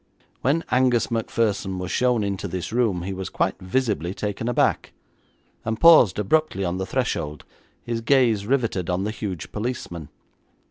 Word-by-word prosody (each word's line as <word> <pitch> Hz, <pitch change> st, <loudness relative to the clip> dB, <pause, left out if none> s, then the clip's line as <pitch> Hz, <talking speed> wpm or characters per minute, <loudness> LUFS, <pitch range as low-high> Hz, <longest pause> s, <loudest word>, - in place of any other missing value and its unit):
When 155 Hz, +5 st, +1 dB
Angus 125 Hz, -2 st, +2 dB
Macpherson 105 Hz, -4 st, -1 dB
was 90 Hz, 0 st, -4 dB
shown 125 Hz, -3 st, +2 dB
into 100 Hz, 0 st, -3 dB
this 90 Hz, +3 st, -5 dB
room 110 Hz, -8 st, +1 dB
he 95 Hz, +2 st, -4 dB
was 95 Hz, -1 st, -5 dB
quite -, -, -1 dB
visibly 95 Hz, -3 st, -1 dB
taken 105 Hz, +3 st, -3 dB
aback, 120 Hz, -, +1 dB, 0.7 s
and 110 Hz, 0 st, -2 dB
paused 160 Hz, -, +7 dB
abruptly 105 Hz, -2 st, +1 dB
on 90 Hz, +1 st, -2 dB
the 95 Hz, -, -3 dB
threshold, 75 Hz, -, -2 dB, 0.4 s
his 115 Hz, -1 st, -3 dB
gaze 115 Hz, -5 st, +2 dB
riveted 115 Hz, -10 st, 0 dB
on 90 Hz, +2 st, 0 dB
the 105 Hz, -, -2 dB
huge 100 Hz, -7 st, -5 dB
policeman. 105 Hz, -, -5 dB
105 Hz, 150 wpm, -23 LUFS, 95-125 Hz, 0.7 s, paused